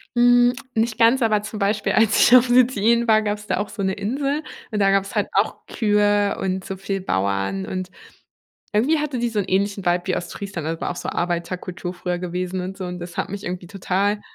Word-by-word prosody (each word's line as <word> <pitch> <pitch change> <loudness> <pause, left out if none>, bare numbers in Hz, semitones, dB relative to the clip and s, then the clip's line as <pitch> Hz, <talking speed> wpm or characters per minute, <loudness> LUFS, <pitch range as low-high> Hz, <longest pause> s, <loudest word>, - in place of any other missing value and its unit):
Hm, 245 0 +5 0.2
nicht 225 0 0
ganz, 235 +3 +4
aber 215 -2 +2
zum 215 0 -7
Beispiel, 205 +2 0
als 220 -1 +3
ich 250 - +8
auf 250 0 +6
Sizilien 235 -1 +3
war, 220 -1 +5
gab's 210 0 -3
da - - 0
auch 205 - -3
so 200 - -6
'ne 190 0 0
Insel 275 +9 -2 0.3
und 210 - -1
da 195 -1 +4
gab's 195 0 0
halt - - 0
auch - - 0
Kühe 205 -2 +2
und 190 0 -2
so 195 - -5
viel 195 +1 -3
Bauern 100 - -1
und 185 -1 -4 0.8
irgendwie 260 +10 +2
hatte 295 -4 -2
die 240 0 0
so 220 -2 -1
'n 195 - -1
ähnlichen 200 +1 0
Vibe 175 0 +1
wie 185 - 0
Ostfriesland, 175 -2 -5
also, 165 0 -3
war - - -1
auch - - -7
so - - -4
Arbeiterkultur 175 +1 -3
früher 180 0 -3
gewesen 180 +1 -3
und 190 +2 -6
so 185 - -5
und 180 0 -6
das 175 0 -8
hat - - -2
mich 200 +1 -6
irgendwie 180 -1 -5
total 200 +2 -1
200 Hz, 220 wpm, -22 LUFS, 185-220 Hz, 0.8 s, ich